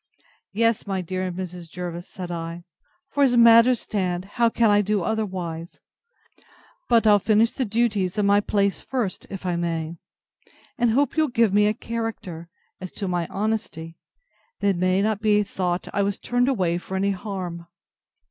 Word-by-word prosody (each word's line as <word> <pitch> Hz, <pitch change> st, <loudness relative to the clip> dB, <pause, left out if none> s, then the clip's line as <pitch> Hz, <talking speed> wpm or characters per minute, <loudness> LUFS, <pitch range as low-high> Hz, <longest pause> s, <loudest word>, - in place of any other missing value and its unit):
Yes, 230 Hz, +1 st, +1 dB
my 190 Hz, -2 st, -1 dB
dear 185 Hz, +1 st, -3 dB
Mrs. 180 Hz, -2 st, -7 dB
Jervis, 175 Hz, 0 st, -6 dB
said 180 Hz, -2 st, -7 dB
I; 170 Hz, 0 st, -5 dB, 0.5 s
for, 285 Hz, -, -1 dB
as 250 Hz, -3 st, +4 dB
matters 230 Hz, +1 st, +7 dB
stand, 185 Hz, -3 st, -2 dB
how 230 Hz, +4 st, +1 dB
can 230 Hz, -1 st, +3 dB
I 205 Hz, 0 st, +5 dB
do 205 Hz, -2 st, 0 dB
otherwise?—But 220 Hz, -, -4 dB
I'll 210 Hz, -1 st, +6 dB
finish 220 Hz, +3 st, +3 dB
the 260 Hz, -, -2 dB
duties 210 Hz, -4 st, 0 dB
of 210 Hz, -, +2 dB
my 200 Hz, 0 st, +5 dB
place 200 Hz, -1 st, 0 dB
first, 240 Hz, -8 st, -3 dB
if 195 Hz, -1 st, -7 dB
I 175 Hz, -1 st, 0 dB
may; 165 Hz, -1 st, -3 dB, 0.8 s
and 240 Hz, -1 st, +2 dB
hope 275 Hz, +6 st, +1 dB
you'll 315 Hz, -1 st, +3 dB
give 230 Hz, -6 st, +2 dB
me 210 Hz, 0 st, +4 dB
a 210 Hz, -, +1 dB
character, 220 Hz, -9 st, -5 dB, 0.3 s
as 185 Hz, -1 st, -7 dB
to 200 Hz, -, -4 dB
my 175 Hz, -2 st, -1 dB
honesty, 195 Hz, -6 st, -3 dB, 0.6 s
that 200 Hz, -, +2 dB
it 195 Hz, -, +1 dB
may 185 Hz, +2 st, +2 dB
not 215 Hz, -1 st, 0 dB
be 210 Hz, -1 st, +3 dB
thought 180 Hz, -2 st, -2 dB
I 200 Hz, -, +1 dB
was 200 Hz, 0 st, 0 dB
turned 245 Hz, +2 st, +1 dB
away 180 Hz, -9 st, 0 dB
for 190 Hz, -, -7 dB
any 200 Hz, +1 st, +1 dB
harm. 180 Hz, -3 st, -5 dB
200 Hz, 165 wpm, -24 LUFS, 180-225 Hz, 0.8 s, matters